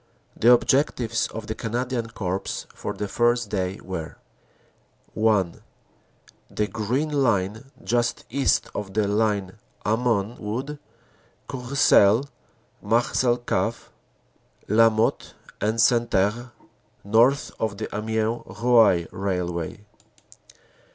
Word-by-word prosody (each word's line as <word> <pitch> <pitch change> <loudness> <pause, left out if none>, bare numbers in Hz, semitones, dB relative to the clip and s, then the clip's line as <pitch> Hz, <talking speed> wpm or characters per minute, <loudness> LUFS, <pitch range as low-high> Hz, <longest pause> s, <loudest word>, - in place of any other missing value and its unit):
The 120 - +5
objectives 120 -2 +2
of 110 0 -7
the 110 - -3
Canadian 120 +1 -3
Corps 95 -3 -4
for - - -5
the 105 - -4
first 120 +1 +1
day 95 -1 -2
were: 90 -4 -6 1.0
(1) 105 -6 +1 0.9
The 105 - -1
Green 125 +9 -2
Line, 115 -3 0
just 120 0 0
east 140 -1 +1
of 100 -2 -6
the 105 -2 +2
line 105 -2 0 0.3
Hamon 110 -1 0
Wood 130 +8 -4 0.7
Courcelles 130 -3 +3 0.6
Marcelcave 120 +2 0 0.8
Lamotte 110 +1 +2 0.3
en 110 +2 0
Santerre 115 0 +2 0.5
(north 120 +7 +3
of 110 -2 -2
the 110 - -4
Amiens 110 +2 -1 0.2
Roye 115 -8 +4
railway). 90 0 -3
110 Hz, 95 wpm, -24 LUFS, 100-120 Hz, 1.0 s, The